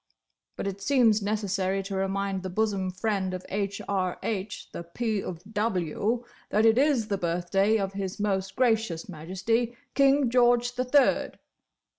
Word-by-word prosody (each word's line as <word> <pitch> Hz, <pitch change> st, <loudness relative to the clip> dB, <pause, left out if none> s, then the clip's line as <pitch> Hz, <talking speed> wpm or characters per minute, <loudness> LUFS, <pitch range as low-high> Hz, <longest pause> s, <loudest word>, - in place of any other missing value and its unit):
"But -, -, -4 dB
it 200 Hz, 0 st, -4 dB
seems 230 Hz, -3 st, +3 dB
necessary 195 Hz, -2 st, -1 dB
to 195 Hz, 0 st, -5 dB
remind 195 Hz, 0 st, -1 dB
the 185 Hz, -, -5 dB
bosom 195 Hz, -1 st, 0 dB
friend 190 Hz, -1 st, -1 dB
of 185 Hz, -, -8 dB
H.R.H. 195 Hz, 0 st, -3 dB
the -, -, -6 dB
P. 210 Hz, +4 st, -2 dB
of 175 Hz, -2 st, -7 dB
W. 210 Hz, +2 st, 0 dB, 0.3 s
that 215 Hz, +2 st, +3 dB
it 225 Hz, +2 st, +5 dB
is 270 Hz, -6 st, +2 dB
the 200 Hz, -2 st, -1 dB
birthday 180 Hz, +5 st, +1 dB
of 195 Hz, -2 st, -2 dB
His 195 Hz, +1 st, -4 dB
Most 195 Hz, -2 st, -1 dB
Gracious 225 Hz, -9 st, +1 dB
Majesty 195 Hz, +8 st, -2 dB, 0.2 s
King 275 Hz, -2 st, +4 dB
George 245 Hz, 0 st, +3 dB
the 250 Hz, +1 st, -1 dB
Third! 275 Hz, +2 st, +3 dB
200 Hz, 145 wpm, -27 LUFS, 190-225 Hz, 0.3 s, it